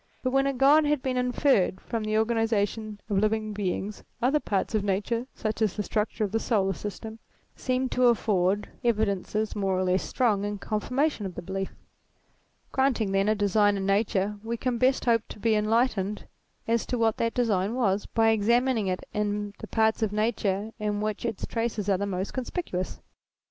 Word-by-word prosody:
But 255 - 0
when 270 +1 +3
a 275 - 0
God 280 +4 +5
had 295 -2 +1
been 260 -1 -1
inferred 250 -6 +2
from 230 -2 -4
the 215 0 0
organization 220 -1 0
of 200 -3 +1
living 215 0 0
beings, 200 +1 -3 0.2
other 260 +5 +2
parts 200 -5 -1
of 215 -2 +1
Nature, 210 +5 -1
such 215 0 -3
as 215 -4 +1
the 210 - -2
structure 215 +2 -1
of 200 - -1
the 225 - +1
solar 195 -5 +1
system, 220 +4 -7 0.4
seemed 255 0 -1
to 250 0 +4
afford 205 -4 +2 0.2
evidences, 215 -2 0
more 195 -2 0
or 185 - +1
less 185 0 +2
strong, 220 -6 +1
in 205 0 -2
confirmation 240 +3 -1
of 180 - -9
the 175 - -6
belief: 195 +2 -3 1.0
granting, 255 -6 +1
then, 195 +1 +2
a 215 - +3
design 205 0 +3
in 195 - -2
Nature, 200 0 +1
we 230 +1 -3
can 245 -1 -1
best 260 +2 +2
hope 230 -2 +4
to - - -8
be 225 +2 +1
enlight 225 +4 +3
ened 200 +1 -3 0.4
as 230 0 +1
to 250 - -1
what 225 -1 +2
that 230 0 -1
design 215 -3 +1
was, 205 -5 +1
by 225 -1 +3
examining 230 +1 +2
it 185 -1 -2
in 205 -1 -2
the - - -7
parts 220 0 +1
of 220 -2 +1
Nature 210 -1 0
in 210 -1 -1
which 215 +1 -2
its 225 - -3
traces 230 -3 -2
are 195 -2 +2
the 200 - -1
most 190 0 -3
conspicuous. 250 - -3
215 Hz, 190 wpm, -27 LUFS, 200-235 Hz, 1.0 s, God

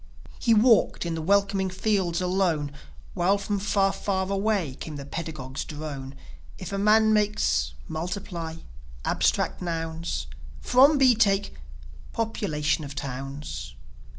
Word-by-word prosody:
He 230 -2 +4
walked 225 -4 +4
in 170 - -2
the 165 - -3
welcoming 195 +2 +2
fields 185 -2 0
alone, 180 -6 +1 0.4
While 190 +2 +2
from 200 0 -2
far, 195 -1 +2
far 190 -2 -1
away 195 -7 0
came 155 - -6
the 140 -1 -7
pedagogue's 140 -4 -5
drone: 145 -3 -7 0.4
"If 185 +1 -7
a 195 - -1
man 215 +1 +5
makes.. 135 - +1
.Multiply... 170 -1 -4 0.5
Abstract - - +1
nouns... 165 - -3 0.3
From 275 +4 +5
B 260 -2 +6
take.. 200 -3 +2 0.6
.Population 160 -9 -1
of 140 -1 -8
towns 135 - -6
180 Hz, 125 wpm, -26 LUFS, 150-205 Hz, 0.6 s, B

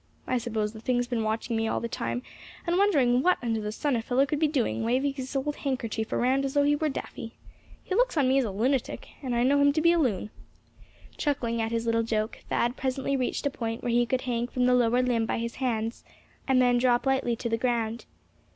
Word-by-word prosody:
"I 255 - 0
suppose 220 -3 -2
the 220 - -10
thing's 245 +1 +1
been 240 -2 -2
watching 225 +2 -2
me 225 0 0
all - - 0
the 235 - -3
time, 245 +1 -3 0.4
and 345 0 +1
wondering 270 -12 +3
what 365 +5 +3
under 225 -2 -1
the 210 0 -3
sun 280 +5 -1
a 230 - 0
fellow 250 +4 +2
could 285 +2 -2
be 310 - +3
doing, 265 -6 0
waving 260 +5 +1
his 265 0 -6
old 290 +2 -1
handkerchief 230 -5 -3
around 260 +3 +2
as 275 +1 -3
though 285 - +4
he 290 +1 +3
were 310 +1 0
daffy. 230 -4 -6 0.5
He - - -4
looks - - +2
on 275 -3 +3
me 265 +1 +4
as - - +2
a 225 - -2
lunatic, 240 +6 -1
and 255 -4 -2
I 235 - +2
know 285 +3 +3
him 285 0 +5
to 310 - +1
be 335 +2 +5
a 340 - +3
loon." 215 - 0 0.9
Chuckling 235 -5 -1
at 225 0 -2
his 230 0 -1
little 230 0 +2
joke, 220 -1 -2
Thad 240 +1 +1
presently 270 +1 -1
reached 255 +2 -2
a 285 - +1
point 230 -2 -4
where 240 - 0
he 240 0 +3
could 255 +1 0
hang 240 -1 -1
from 250 0 0
the 250 - +4
lower 245 0 +3
limb 235 -3 +1
by - - -1
his 235 0 -4
hands, 230 -3 -2 0.4
and 265 -1 +4
then 245 -1 +4
drop 245 0 +2
lightly 265 -3 +1
to 235 - -4
the 230 - +1
ground. 230 -1 -1
245 Hz, 240 wpm, -27 LUFS, 230-270 Hz, 0.9 s, him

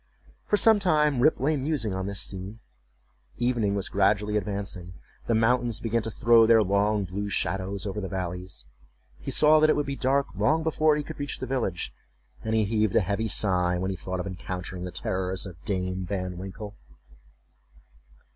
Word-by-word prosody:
For 210 - +3
some 220 0 +5
time 150 -7 +2
Rip 155 +6 +4
lay 150 +5 +1
musing 135 -7 -1
on 95 0 -3
this 100 0 -2
scene; 95 +3 -3 0.8
evening 120 -5 +1
was 100 - -2
gradually 105 +2 +1
advancing; 100 -3 -4 0.3
the 115 - +2
mountains 120 0 +2
began 115 0 0
to 110 - -4
throw 115 0 +5
their 115 -1 +6
long 100 +2 +1
blue 100 +3 -4
shadows 95 +1 -2
over 105 +1 -3
the 95 - -4
valleys; 90 -4 -4 0.5
he - - -6
saw 155 0 +5
that 155 0 +4
it - - +4
would 145 - 0
be 140 - -3
dark 135 +1 +1
long 145 +12 +1
before 155 -1 +2
he 150 - -2
could 160 +1 -9
reach 145 0 -3
the - - -5
village, 125 -9 -2 0.5
and 110 0 -1
he 110 - +3
heaved 110 -1 0
a - - +5
heavy 100 +4 -1
sigh 90 -4 +2
when 95 +2 -2
he - - -3
thought 95 +1 -5
of 90 - -3
encountering 90 -1 -5
the 90 - -5
terrors 95 +1 -3
of 85 -4 -11
Dame 95 -2 -2
Van 90 -1 -3
Winkle. 100 +2 -8
105 Hz, 185 wpm, -26 LUFS, 95-125 Hz, 0.8 s, their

